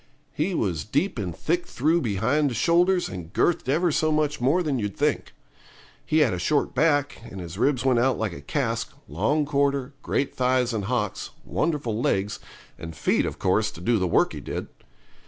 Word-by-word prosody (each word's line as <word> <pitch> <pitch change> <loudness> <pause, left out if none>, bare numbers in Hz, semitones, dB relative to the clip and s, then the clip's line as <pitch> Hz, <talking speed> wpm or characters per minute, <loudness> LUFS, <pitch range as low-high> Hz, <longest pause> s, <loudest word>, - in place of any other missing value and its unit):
He 170 +5 -1
was 85 - -1
deep 145 - -1
and 90 -5 -4
thick 175 +2 -1
through 160 +6 +1
behind 125 +7 +1
the 120 - -4
shoulders, 175 - +3
and 90 -2 -8
girthed 160 - +1
ever 165 +5 +2
so 155 +1 +1
much 150 -2 0
more 150 +9 +3
than 145 -5 -1
you'd 105 -2 -4
think. 150 0 0 0.7
He 155 0 +2
had 130 -9 +3
a 90 - -3
short 145 - +1
back, 145 0 +1
and 95 - -8
his 90 +2 -7
ribs 135 -1 +1
went 130 -3 +4
out 130 +1 +2
like 110 -5 -2
a 70 - -9
cask, 70 - -2
long 110 - 0
quarter, 140 -1 0
great 140 - -1
thighs 125 -1 +1
and 105 -3 -2
hocks, 105 -3 -2 0.2
wonderful 140 -9 -1
legs, 100 -2 0 0.4
and 80 -1 -7
feet - - +1
of - - -5
course - - +1
to - - -11
do 110 +5 +1
the 90 - +1
work 85 - +2
he - - -6
did. - - -5
130 Hz, 190 wpm, -25 LUFS, 105-150 Hz, 0.7 s, went